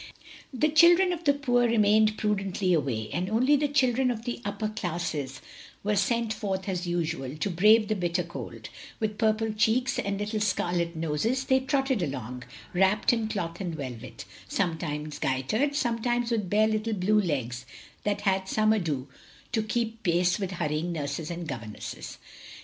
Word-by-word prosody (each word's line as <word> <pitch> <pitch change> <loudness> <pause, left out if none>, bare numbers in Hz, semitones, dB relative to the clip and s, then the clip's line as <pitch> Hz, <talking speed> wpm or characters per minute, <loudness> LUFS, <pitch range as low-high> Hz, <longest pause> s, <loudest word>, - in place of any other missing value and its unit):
The 280 +4 +1
children 345 +4 +6
of 345 -1 -7
the 285 - +5
poor 245 -4 +2
remained 215 -1 +4
prudently 195 -3 0
away; 125 -9 -1
and 180 +2 -1
only 255 +7 +4
the 290 +1 +2
children 260 -2 +2
of 230 -2 -3
the 240 -1 -4
upper 205 +1 -2
classes 165 -9 -3 0.4
were 210 +1 +1
sent 225 +3 +1
forth 190 -3 -3
as 180 -2 -2
usual, 165 -5 -2
to 195 +5 -1
brave 210 +5 +5
the 215 - 0
bitter 175 -1 0
cold; 170 - -8 0.3
with 215 -2 -2
purple 220 -1 +1
cheeks 230 +4 +2
and 200 0 -1
little 210 +1 -2
scarlet 175 -4 0
noses 165 - -1
they 265 0 +4
trotted 265 -3 0
along, 125 -5 -4 0.3
wrapped 190 +5 +3
in 225 -2 0
cloth 180 -5 -4
and 175 -4 -3
velvet; 130 -7 -7 0.2
sometimes 155 - -2
gaitered, 215 - 0
sometimes 240 -2 0
with 210 -6 0
bare 215 +2 +4
little 220 +1 -1
blue 210 +2 +3
legs 130 - -3 0.4
that 205 0 -1
had 190 -2 0
some 215 +1 +3
ado 155 -10 -1 0.4
to 230 -3 +1
keep 225 +1 -2
pace 175 -1 +2
with 195 -2 -2
hurrying 160 0 -1
nurses 150 -1 -3
and 170 -1 -5
governesses. 115 -6 -7
205 Hz, 160 wpm, -27 LUFS, 170-225 Hz, 0.4 s, children